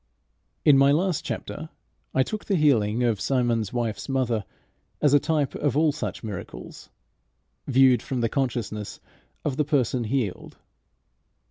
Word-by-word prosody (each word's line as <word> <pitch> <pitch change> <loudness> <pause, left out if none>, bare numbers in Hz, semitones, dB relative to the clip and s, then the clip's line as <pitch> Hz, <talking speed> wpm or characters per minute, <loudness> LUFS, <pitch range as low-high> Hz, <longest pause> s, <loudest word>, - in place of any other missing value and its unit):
In 140 -3 +7
my 140 +1 +6
last 175 +2 +1
chapter - - -5 0.4
I 130 - +3
took 215 +9 -5
the 200 - +1
healing 125 - +2
of 115 -5 +1
Simon's 120 -5 0
wife's 120 +1 -3
mother 120 -6 0 0.5
as 145 -2 +3
a 145 - +7
type 150 -2 0
of 145 -2 -1
all 155 0 +4
such 145 - -5
miracles, 105 -5 -8 0.8
viewed 130 -3 +5
from 130 -3 -3
the 115 - +2
consciousness 115 -5 -3 0.5
of 140 -2 -1
the 150 - +3
person 130 -5 0
healed. 110 -5 -3
130 Hz, 140 wpm, -25 LUFS, 115-145 Hz, 0.8 s, In